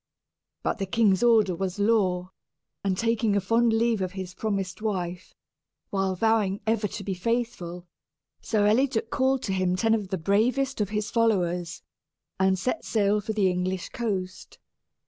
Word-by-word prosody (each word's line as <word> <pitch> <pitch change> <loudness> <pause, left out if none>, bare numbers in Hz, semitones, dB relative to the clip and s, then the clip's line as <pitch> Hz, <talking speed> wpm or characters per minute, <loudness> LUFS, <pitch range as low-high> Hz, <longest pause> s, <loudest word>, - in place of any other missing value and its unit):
But - - -1
the 195 - -2
king's 195 -2 +3
order 225 -5 +4
was 190 +1 -3
law; 190 -4 +1 0.5
and, 190 -2 0
taking 230 -2 +1
a - - +3
fond 230 +4 +2
leave 225 -1 +1
of 185 0 -2
his 185 -2 -6
promised 195 -3 -3
wife, 180 -4 -3 0.6
while 195 -1 0
vowing 210 -1 +1
ever 220 -1 +1
to 200 - -7
be 195 - -2
faithful, 185 -4 -3 0.6
Sir 215 -2 +1
Eliduc 235 +1 +1
called 265 0 +1
to 195 - -1
him 185 -1 +1
ten 225 +4 +2
of 210 -3 0
the 190 - -2
bravest 230 +9 +1
of 205 - 0
his 210 0 -2
followers, 180 -7 0 0.6
and 190 0 +3
set 255 - -2
sail 210 -1 +1
for 220 +2 -3
the 205 -3 +2
English 180 0 -2
coast. 195 -6 -4
200 Hz, 160 wpm, -26 LUFS, 185-225 Hz, 0.6 s, order